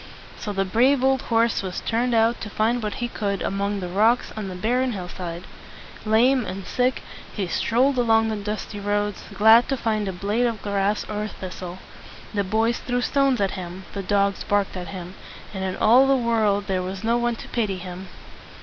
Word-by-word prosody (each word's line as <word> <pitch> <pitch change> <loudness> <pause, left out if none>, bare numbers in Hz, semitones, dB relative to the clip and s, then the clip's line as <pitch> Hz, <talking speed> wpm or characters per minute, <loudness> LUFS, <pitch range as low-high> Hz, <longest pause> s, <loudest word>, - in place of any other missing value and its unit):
So 210 - -4
the 195 -1 0
brave 255 +7 +3
old 265 0 +3
horse 230 -1 +1
was 185 -2 -4
turned 235 +1 0
out 225 +1 +2
to 210 - -5
find 225 +4 0
what 210 -2 -3
he 240 - -2
could 200 -4 -2
among 200 0 -1
the 180 - -3
rocks 220 +7 +2
on 215 -2 -4
the 185 - -6
barren 245 +6 0
hill 185 -3 -5
side. 175 -1 -6 0.6
Lame 245 +4 +4
and 190 -1 -6
sick, 250 0 0 0.3
he 200 - -1
strolled 250 +8 +1
along 225 -2 +3
the 220 - -1
dusty 210 0 -5
roads, 205 0 -1
glad 220 +4 +6
to 270 - 0
find 215 -3 -1
a - - -1
blade 205 +6 0
of 230 -2 -4
grass 200 0 0
or 210 0 -3
a - - -3
thistle. 185 -2 -7 0.6
The 200 -1 +1
boys 220 +4 +1
threw 245 0 -1
stones 275 -1 +2
at 195 -1 +1
him, 185 +1 -7
the 200 - -3
dogs 200 0 +1
barked 205 -1 0
at 180 -1 -5
him, 180 +1 -7 0.4
and 190 -1 -4
in 190 -1 -2
all 250 +5 +6
the 275 - +4
world 220 -5 +1
there 190 -1 -1
was 185 +2 -5
no 230 +2 +2
one 240 0 0
to - - -10
pity 210 -5 -1
him. 180 +1 -8
210 Hz, 205 wpm, -24 LUFS, 195-235 Hz, 0.6 s, glad